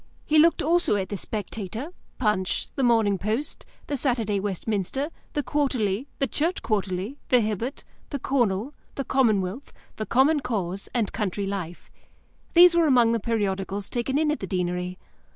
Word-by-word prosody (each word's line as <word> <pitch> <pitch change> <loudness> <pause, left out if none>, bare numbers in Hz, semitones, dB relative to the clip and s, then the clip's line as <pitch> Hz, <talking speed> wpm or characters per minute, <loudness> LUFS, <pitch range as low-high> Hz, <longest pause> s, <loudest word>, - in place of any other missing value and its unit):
He 310 0 +4
looked 330 +2 +5
also 340 -5 +3
at 190 -2 -2
the 205 - -3
Spectator, 215 - -4 0.3
Punch, 210 -6 0
the 275 - -2
Morning 225 -6 +3
Post, 220 +9 -2 0.2
the 290 - -2
Saturday 235 -7 +1
Westminster, 205 - -2 0.2
the 290 - 0
Quarterly, 255 -6 0
the 275 - +1
Church 325 +6 -1
Quarterly, 200 +4 -2
the 250 - +6
Hibbert, 220 +4 -2 0.3
the 285 - -2
Cornhill, 240 -2 0 0.2
the 275 - -3
Commonwealth, 220 -2 +1 0.3
the 215 - -4
Common 280 +5 +4
Cause, 195 -7 -3
and 225 -4 0
Country 200 -1 -2
Life. 185 -4 -5 0.6
These 350 0 +9
were 335 -2 +4
among 245 -4 +5
the 230 - +1
periodicals 200 -3 -2
taken 255 +3 0
in 305 0 +2
at 300 - -2
the - - -5
Deanery. 180 -1 -2
225 Hz, 155 wpm, -25 LUFS, 195-275 Hz, 0.6 s, These